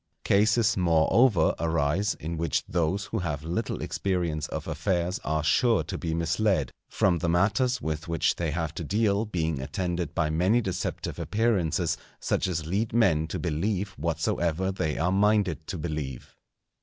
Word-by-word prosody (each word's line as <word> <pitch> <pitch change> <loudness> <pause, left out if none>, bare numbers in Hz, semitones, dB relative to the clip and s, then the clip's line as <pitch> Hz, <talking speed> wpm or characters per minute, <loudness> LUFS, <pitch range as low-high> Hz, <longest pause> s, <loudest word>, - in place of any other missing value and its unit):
Cases, 110 +2 +3
moreover, 90 +3 +4
arise 85 +4 +1
in 85 +2 -5
which 80 -2 -1
those 90 +4 0
who 110 - -3
have 75 -5 -3
little 85 +8 -3
experience 85 -6 -1
of - - -5
affairs 90 -1 -1
are 80 -1 -1
sure 115 +6 +3
to - - -6
be 80 -2 -2
misled, 85 - +1 0.2
from 90 -3 +2
the 85 - -1
matters 110 +9 +2
with 80 +1 -3
which 85 -2 +1
they 85 -2 -1
have 80 0 -2
to 85 - -5
deal 105 +4 +1
being 80 -8 -2
attended 85 +1 -3
by 75 -3 +1
many 90 +9 +3
deceptive 95 -4 -3
appearances 85 -2 0 0.2
such - - 0
as 80 -4 -2
lead 100 +7 -1
men 90 -9 +3
to - - -4
believe 95 +5 -1
whatsoever 85 +1 -1
they 80 -5 -2
are 90 +3 +1
minded 95 -5 +2
to 90 - -4
believe. 75 -5 -5
85 Hz, 155 wpm, -27 LUFS, 80-100 Hz, 0.2 s, moreover